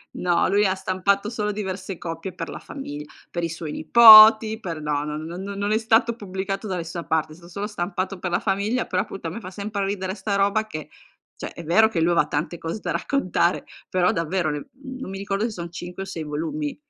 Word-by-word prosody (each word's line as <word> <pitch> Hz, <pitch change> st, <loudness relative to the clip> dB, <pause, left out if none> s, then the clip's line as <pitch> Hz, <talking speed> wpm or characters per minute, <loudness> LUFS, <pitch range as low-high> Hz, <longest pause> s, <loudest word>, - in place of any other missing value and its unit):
No, 175 Hz, -1 st, +1 dB
lui 205 Hz, +1 st, +3 dB
ha 190 Hz, -, +2 dB
stampato 190 Hz, +2 st, 0 dB
solo 210 Hz, -2 st, -2 dB
diverse 190 Hz, -2 st, -5 dB
copie 165 Hz, +2 st, -6 dB
per 165 Hz, -1 st, -6 dB
la -, -, -6 dB
famigl 150 Hz, -, -8 dB, 0.2 s
per 170 Hz, -, -4 dB
i 165 Hz, -, -1 dB
suoi 160 Hz, -2 st, -6 dB
nipoti, 220 Hz, +3 st, +8 dB
per 165 Hz, -7 st, -5 dB
no, 150 Hz, -1 st, -1 dB
non 150 Hz, +1 st, -4 dB
non 175 Hz, +3 st, -6 dB
non 200 Hz, +1 st, -3 dB
è 215 Hz, -, +3 dB
stato 225 Hz, +1 st, +2 dB
pubblicato 195 Hz, -1 st, -4 dB
da 190 Hz, -3 st, -2 dB
nessuna 170 Hz, 0 st, -5 dB
parte, 155 Hz, -1 st, -1 dB
son 170 Hz, 0 st, -16 dB
solo 200 Hz, +4 st, -5 dB
stampato 190 Hz, -1 st, -3 dB
per 180 Hz, -1 st, -4 dB
la 175 Hz, -, +1 dB
famiglia, 205 Hz, +5 st, -1 dB
però 185 Hz, +1 st, 0 dB
appunto 195 Hz, -6 st, -7 dB
a -, -, -2 dB
me 190 Hz, +8 st, -6 dB
fa 185 Hz, -4 st, -9 dB
sempre 200 Hz, 0 st, -3 dB
ridere 190 Hz, -1 st, -3 dB
sta 205 Hz, -2 st, -2 dB
roba 200 Hz, +2 st, +2 dB
che, 155 Hz, -8 st, -8 dB, 0.5 s
cioè, -, -, -7 dB
è 170 Hz, -, -9 dB
vero 200 Hz, +8 st, +4 dB
che 175 Hz, -7 st, -1 dB
lui 170 Hz, +2 st, +3 dB
aveva 170 Hz, -, +3 dB
tante 155 Hz, +4 st, -3 dB
cose 165 Hz, +6 st, -5 dB
da -, -, -5 dB
raccontare, 185 Hz, -10 st, 0 dB, 0.2 s
però 185 Hz, +2 st, +2 dB
davvero 170 Hz, -2 st, -1 dB
le 150 Hz, -1 st, -5 dB
mhmm 265 Hz, -1 st, -9 dB
non 190 Hz, -, -6 dB
mi 195 Hz, -, -6 dB
ricordo 200 Hz, +1 st, -2 dB
se 230 Hz, -, -1 dB
son 170 Hz, -4 st, -7 dB
5 175 Hz, +2 st, -7 dB
o -, -, -7 dB
6 170 Hz, -4 st, -5 dB
volumi. 150 Hz, 0 st, -3 dB
190 Hz, 225 wpm, -23 LUFS, 170-210 Hz, 0.5 s, nipoti